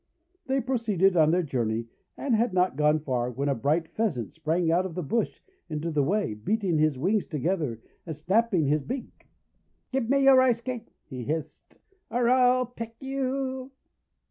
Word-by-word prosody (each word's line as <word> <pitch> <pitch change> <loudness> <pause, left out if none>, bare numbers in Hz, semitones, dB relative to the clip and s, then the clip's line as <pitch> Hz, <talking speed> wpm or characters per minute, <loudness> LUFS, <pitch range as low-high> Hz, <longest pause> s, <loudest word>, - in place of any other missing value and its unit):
They 265 0 +1
proceeded 215 -7 +1
on 155 -2 +5
their 175 +2 +2
journey, 115 -6 -1 0.3
and 275 - -1
had 225 -1 +2
not 180 -6 +2
gone 150 +1 +3
far 125 -4 -1
when 135 +4 -3
a 140 - +2
bright 150 +7 0
Pheasant 160 - -2
sprang 160 +2 0
out 175 +2 +3
of 185 -2 -6
a 180 - -2
bush 225 +10 -2 0.3
into 155 +1 -3
the 150 -2 +2
way, 195 - 0
beating 175 - 0
his 155 -3 +2
wings 195 +9 0
together, 150 - -2 0.3
and 160 - -4
snapping 190 +2 +1
his 150 +2 +2
beak. 255 - -7 0.6
'Give 260 -3 -1
me 275 0 +3
a 270 - +8
Rice 255 -3 +5
Cake," 240 -2 -6
he 130 -3 -7
hissed, 155 +2 -5 0.3
"or 240 0 +1
I'll 255 0 +4
peck 230 -1 -8
you!' 265 -1 -3
180 Hz, 170 wpm, -27 LUFS, 150-240 Hz, 0.6 s, a